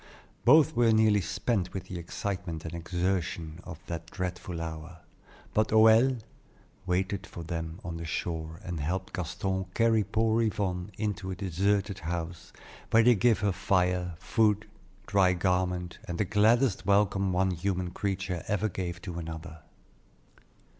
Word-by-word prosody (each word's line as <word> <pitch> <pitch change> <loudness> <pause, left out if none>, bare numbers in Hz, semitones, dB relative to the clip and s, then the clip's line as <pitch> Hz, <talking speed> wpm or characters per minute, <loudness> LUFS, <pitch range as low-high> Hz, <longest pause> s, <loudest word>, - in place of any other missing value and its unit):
Both 155 +4 +6
were 120 -1 +4
nearly 110 -2 +4
spent 95 0 -1
with 95 - -3
the 90 - -6
excitement 90 -2 -4
and 80 - -5
exertion 85 -1 -2
of 80 - -8
that 85 -1 -6
dreadful 90 -1 -4
hour; 80 +1 -6 0.5
but 110 0 +3
Hoël 110 +3 +5 0.7
waited 95 +2 -1
for 85 - -8
them 80 0 -5
on 85 -2 -5
the 85 - -6
shore 80 0 -3
and 85 -2 -4
helped 90 +6 -3
Gaston 95 +2 -2
carry 115 -2 +3
poor 110 +3 +1
Yvonne 100 -4 -1
into 105 -3 -2
a 95 - -3
deserted 100 +2 0
house, 85 0 -5 0.4
where 115 0 +5
they 125 +1 +7
gave 115 +1 +3
her 105 -1 +2
fire, 90 -2 +1
food, 105 +2 +1 0.4
dry 95 -2 +3
garments, 90 -1 -1
and 85 - -4
the 105 - +1
gladdest 110 +4 +3
welcome 100 -1 +3
one 95 +1 +2
human 90 0 -2
creature 95 -2 -2
ever 105 +1 0
gave 90 -2 -5
to 85 -4 -5
another. 80 0 -7
95 Hz, 145 wpm, -29 LUFS, 85-105 Hz, 0.7 s, they